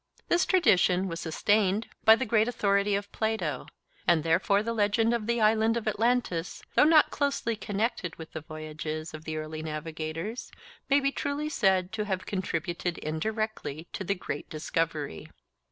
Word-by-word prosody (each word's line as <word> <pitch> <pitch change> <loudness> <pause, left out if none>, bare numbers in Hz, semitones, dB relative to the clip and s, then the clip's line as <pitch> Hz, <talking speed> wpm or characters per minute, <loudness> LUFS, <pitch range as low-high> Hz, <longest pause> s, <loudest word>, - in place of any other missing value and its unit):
This 345 +1 +3
tradition 190 - +4
was 165 -2 -4
sustained 205 +5 +1 0.2
by 220 - +9
the 260 - -2
great 220 -1 +3
authority 200 -3 +2
of 200 0 -4
Plato, 185 - -2 0.4
and 170 -3 +4
therefore 185 +5 +2
the 230 +1 -2
legend 225 +2 +2
of 230 -2 -2
the 235 0 +1
Island 220 +1 +3
of 225 - -4
Atlantis, 215 -6 0
though - - +6
not 310 -1 +6
closely 280 -5 0
connected 210 -4 -2
with 160 -1 -10
the 155 - -5
voyages 155 0 -6
of 155 0 -9
the 155 0 -3
early 155 0 -5
navigators, 160 +7 -5 0.4
may 280 +1 +5
be 275 0 +1
truly 285 +2 -2
said 190 -9 +2
to 215 -1 -2
have 190 -2 -2
contributed 175 -2 -2
indirectly 170 -1 -3
to - - -4
the 200 +2 0
great 145 -5 -5
discovery. 155 - -3
200 Hz, 160 wpm, -28 LUFS, 160-225 Hz, 0.4 s, by